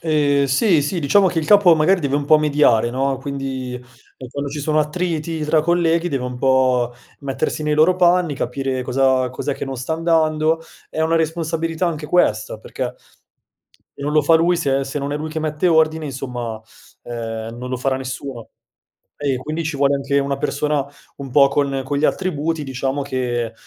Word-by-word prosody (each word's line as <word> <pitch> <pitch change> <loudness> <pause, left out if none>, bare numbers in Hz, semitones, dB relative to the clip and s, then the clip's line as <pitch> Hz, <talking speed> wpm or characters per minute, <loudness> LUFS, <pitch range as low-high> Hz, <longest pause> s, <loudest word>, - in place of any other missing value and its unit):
Eh 145 -3 +2
sì, 155 - +3
sì. 160 +6 -2
Diciamo 190 +7 +4
che 170 - -2
il 155 - -2
capo, 205 -5 +6
magari, 175 +5 +3
deve 140 -2 0
un 145 - -2
pò 155 +2 +6
mediare, 145 -7 +3
no, 135 +2 -1
quindi, 135 -2 -5
ehm, 125 +1 -13
quando 140 +2 -5
ci 150 - -5
sono 155 +2 0
attriti 160 0 -2
tra 155 +1 +3
colleghi 170 0 +2
deve 135 -5 -2
un 125 -1 -5
pò 130 -2 +2 0.3
mettersi 140 +2 -2
nei 150 0 +1
loro 155 +5 +4
panni, 175 -3 +3
capire 130 0 -2
cosa 130 0 +2
cos'è 140 +2 -3
che - - -5
non 135 -1 -5
sta 130 +6 -4
andando. 160 -1 +1 0.3
È - - -5
una 160 +1 +2
responsabilità 165 +1 -1
anche 155 -3 -3
questa, 110 -11 +1
perché 125 +3 -5 1.0
e - - -10
non 145 +1 -2
lo 155 0 +4
fa 165 +3 +4
lui, 170 +2 +3
se 135 -4 0
se 135 +2 -4
non 140 0 -3
è - - -1
lui 155 +1 -4
che 160 - -3
mette 155 +3 0
ordine, 160 -1 +2
insomma, 125 -5 -5 0.4
ehm, 115 -1 -6
non 125 +1 -6
lo 130 - -1
farà 130 +1 0
nessuno 130 -2 -6 0.7
ei 140 -2 +1
e - - -2
quindi 155 +6 -4
ci 155 -2 -3
vuole 140 0 +3
anche 140 0 -1
una 140 0 -1
persona 150 0 -1 0.3
un 140 -1 -7
pò 140 +1 +6
con 140 -1 -1
con 145 +1 -2
gli 150 - +2
attributi, 165 -4 -1
diciamo, 135 +1 -2
che 120 -4 -2
145 Hz, 195 wpm, -20 LUFS, 130-160 Hz, 1.0 s, capo